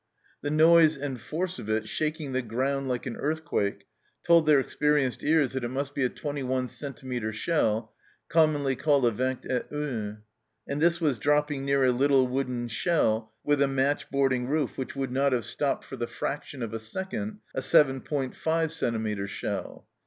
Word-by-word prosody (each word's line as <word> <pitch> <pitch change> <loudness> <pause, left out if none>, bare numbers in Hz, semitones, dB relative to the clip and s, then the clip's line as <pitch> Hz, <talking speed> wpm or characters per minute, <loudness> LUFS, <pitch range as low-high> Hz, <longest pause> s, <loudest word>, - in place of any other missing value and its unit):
The 145 - -2
noise 160 0 +6
and 135 -4 -4
force 175 +8 -3
of 110 - -7
it, 110 0 0
shaking 155 +3 -2
the 130 0 0
ground 135 +4 -1
like 125 -2 -2
an 125 - -4
earthquake, 150 -9 -1 0.4
told 170 -2 +5
their 150 -2 +6
experienced 145 -1 +1
ears 150 -4 +3
that 130 -1 -3
it 120 - -2
must 140 +2 -3
be 140 - 0
a 125 - +2
twenty 145 +1 -5
one 130 -1 -1
centimetre 125 -5 -5
shell, 110 -5 0 0.3
commonly 150 -4 +3
called 140 -2 +2
a 120 - +4
vingt 130 +3 -2
et 125 -2 -1
un; 110 -8 -4 0.4
and 140 +1 -2
this 170 +1 +3
was 145 -8 +1
dropping 145 +1 +1
near 140 -1 +2
a 130 - +5
little 135 +1 +4
wooden 125 -2 -2
shed 115 -3 +1 0.2
with 145 -1 +2
a 140 - +5
match 135 +1 0
boarding 130 -3 +1
roof 145 -1 0
which 130 - -5
would 135 -2 -2
not 135 +1 +2
have 120 -4 0
stopped 140 +4 -1
for 135 - -8
the 120 0 -2
fraction 140 -1 -4
of 110 -1 -5
a 115 - -3
second 190 - -5 0.2
a - - -1
7*5 150 +4 +1
centimetre 110 -9 -2
shell! 95 - -5
135 Hz, 180 wpm, -27 LUFS, 125-150 Hz, 0.4 s, noise